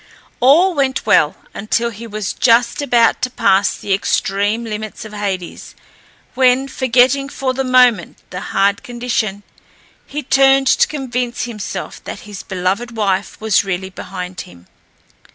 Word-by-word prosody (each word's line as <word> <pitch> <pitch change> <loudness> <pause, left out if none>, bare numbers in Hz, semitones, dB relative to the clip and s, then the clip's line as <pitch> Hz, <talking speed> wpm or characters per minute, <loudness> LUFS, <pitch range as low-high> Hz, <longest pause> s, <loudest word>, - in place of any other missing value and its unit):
All 330 +9 +5
went 270 -4 -1
well - - +3 0.2
until 235 +2 -1
he 230 +2 -9
was 215 -2 -4
just 235 +2 +2
about 240 -5 +2
to 255 - 0
pass 200 -5 +2
the 200 - -2
extreme 205 +3 0
limits 215 0 -6
of 215 - -10
Hades, 195 -4 -5 0.6
when, 260 +1 +3
forgetting 260 +1 +2
for 265 -2 -2
the 270 +1 -2
moment 250 -7 +3
the 180 - -5
hard 200 +1 0
condition, 235 -4 -3 0.6
he 295 +1 -5
turned 270 0 +4
to - - +4
convince 250 -4 -3
himself 220 -5 -6
that - - -7
his 205 -3 -9
beloved 195 +5 -3
wife 195 -2 -1
was 220 -2 +2
really 190 -1 -4
behind 180 -1 -7
him. 90 0 -15
230 Hz, 140 wpm, -17 LUFS, 200-255 Hz, 0.6 s, All